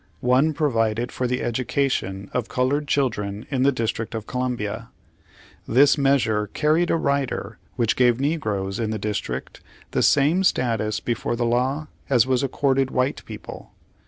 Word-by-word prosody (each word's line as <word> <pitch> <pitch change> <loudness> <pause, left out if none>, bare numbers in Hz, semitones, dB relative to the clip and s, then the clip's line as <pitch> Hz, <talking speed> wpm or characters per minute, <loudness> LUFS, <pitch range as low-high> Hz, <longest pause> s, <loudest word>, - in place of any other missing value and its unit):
One 130 +5 +3
provided 120 -6 0
for 125 - -2
the 125 +1 -1
education 120 -5 -1
of 125 -3 -2
colored 140 +4 0
children 110 -7 -1
in 135 -2 0
the 140 +2 +4
District 115 -2 -3
of 110 -2 -4
Columbia. 115 -3 -3 0.8
This 135 +5 +5
measure 130 -7 +2
carried 155 - +1
a - - +3
rider 140 -8 -1 0.2
which 115 -3 +1
gave 125 -1 +3
negroes 110 -10 -1
in 115 -2 -1
the 110 - -2
District 100 -12 -4 0.3
the - - +1
same 150 +7 +4
status 115 - +1
before 120 0 -2
the 120 0 -1
law 130 +6 0 0.2
as 125 -4 +4
was 130 -1 +1
accorded 135 -1 +1
white 130 +1 -1
people. - - -9
125 Hz, 150 wpm, -23 LUFS, 110-140 Hz, 0.8 s, This